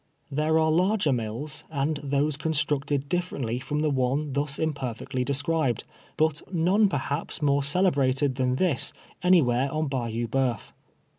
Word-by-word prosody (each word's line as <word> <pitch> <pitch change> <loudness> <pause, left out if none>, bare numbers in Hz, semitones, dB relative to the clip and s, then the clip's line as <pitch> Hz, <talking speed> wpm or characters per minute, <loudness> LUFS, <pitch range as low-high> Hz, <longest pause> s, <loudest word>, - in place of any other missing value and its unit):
There 155 +3 +1
are 160 0 +3
larger 180 -2 +2
mills, 120 +6 -4
and 145 0 -1
those 145 +1 0
constructed 145 -2 0
differ 180 +3 -2
ently 125 -2 -2
from 150 +3 -2
the 155 -1 +1
one 135 +2 0
thus 145 0 -1
imperfectly 135 -4 -2
described, 140 -2 0 0.3
but 155 -1 +1
none, 190 +4 +3
perhaps, 145 0 -2
more 140 0 +3
celebrated 140 -4 +2
than 130 0 0
this 155 -1 0 0.3
anywhere 140 -8 +3
on 155 -1 -1
Bayou 120 -3 -2
B(jeuf. 125 -1 -1
145 Hz, 140 wpm, -26 LUFS, 130-155 Hz, 0.3 s, are